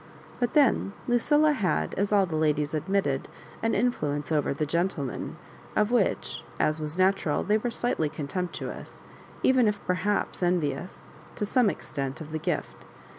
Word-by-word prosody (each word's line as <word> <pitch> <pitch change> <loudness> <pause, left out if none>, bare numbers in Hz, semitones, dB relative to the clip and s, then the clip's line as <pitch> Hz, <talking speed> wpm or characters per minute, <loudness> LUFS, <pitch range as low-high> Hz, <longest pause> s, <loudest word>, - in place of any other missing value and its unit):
But 245 -1 0
then 265 -8 +4
Lucilla 295 +5 +4
had, 190 - 0
as 200 +1 0
all 200 -2 +5
the 165 -3 -4
ladies 150 -1 +1
admitted, 155 -3 0 0.3
an 225 - +1
influence 150 - 0
over 150 -2 +2
"the 145 +2 -1
gentlemen," 165 -4 -2 0.4
of 210 +1 +2
which, 200 -8 0 0.2
as 155 +1 +1
was 155 +2 -4
natural, 185 -5 +2
they 210 +2 +2
were 240 - -1
slightly 230 -10 0
contemptuous, 170 +5 -5 0.4
even 255 -3 +5
if 210 -1 0
perhaps 190 +3 0
envious, 175 -2 -1 0.3
to 210 - -1
some 240 +1 +3
extent, 135 -7 -4
of 155 -1 -8
the 155 - -2
gifk. - - -3
180 Hz, 150 wpm, -27 LUFS, 150-210 Hz, 0.4 s, all